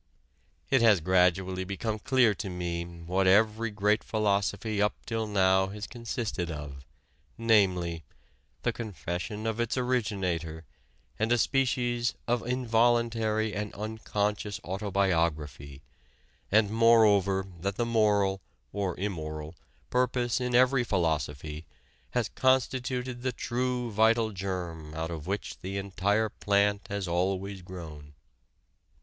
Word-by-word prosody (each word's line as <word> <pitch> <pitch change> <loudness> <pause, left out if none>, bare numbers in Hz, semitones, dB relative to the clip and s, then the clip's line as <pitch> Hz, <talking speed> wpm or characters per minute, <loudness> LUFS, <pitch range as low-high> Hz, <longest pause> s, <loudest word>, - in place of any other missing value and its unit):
It 135 -3 +5
has 110 -5 +6
gradually 95 +2 +2
become 105 +3 -3
clear 125 -2 +3
to 100 0 -5
me 85 -1 -3
what 85 +2 -2
every 110 +3 +4
great 105 +1 +1
philosophy 105 0 0
up 105 - +2
till 115 -1 -2
now 95 -2 +3
has 105 +2 -6
consisted 115 -7 -4
of 75 -3 -7 0.5
namely, 95 -7 +2 0.6
the - - +1
confession 105 - -5
of 115 0 -1
its 120 +2 0
originator, 95 -10 -1 0.5
and 110 +2 +1
a 120 - +5
species 120 -2 +1
of 120 0 +1
involuntary 115 -3 +1
and 105 0 -3
unconscious 105 -1 -2
autobiography, 85 -8 -1 0.7
and, 105 0 +4
moreover, 105 -4 +4
that 100 +3 -2
the 120 - 0
moral 105 -4 +2 0.3
(or 95 -3 -2
immoral) 80 -5 -4 0.4
purpose 125 -1 +1
in 125 -1 0
every 130 0 +5
philosophy 80 - -2 0.4
has - - 0
constituted 130 -1 0
the 130 0 0
true 125 0 -2
vital 110 +1 +3
germ 90 -5 -5
out 80 +1 -3
of 80 -1 -6
which 100 +1 -4
the 95 +2 -5
entire 100 +3 0
plant 100 0 +1
has 100 -2 -3
always 95 +2 -1
grown.... 80 -5 -10
100 Hz, 120 wpm, -29 LUFS, 90-115 Hz, 0.7 s, has